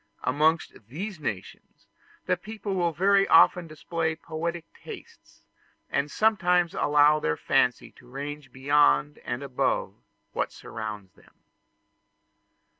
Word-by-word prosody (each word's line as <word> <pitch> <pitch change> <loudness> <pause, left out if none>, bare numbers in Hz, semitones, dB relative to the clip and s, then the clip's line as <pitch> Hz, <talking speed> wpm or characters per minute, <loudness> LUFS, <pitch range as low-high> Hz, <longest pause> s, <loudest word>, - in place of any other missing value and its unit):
Amongst 155 +5 +1
these 180 - -6
nations 105 -10 -7 0.4
the 180 - +2
people 210 +2 -6
will 175 -2 +1
very 195 +4 +3
often 180 -2 +5
display 160 +1 -3
poetic 165 +1 -5
tastes, - - -13 0.5
and 140 +1 0
sometimes 180 -4 +2
allow 150 +1 +4
their 80 - -1
fancy - - +1
to - - -18
range 145 +3 -7
beyond 130 - +2
and 120 +3 -5
above 135 -2 -1 0.4
what - - -2
surrounds 105 -4 -8
them. - - -24
155 Hz, 115 wpm, -26 LUFS, 135-175 Hz, 0.5 s, often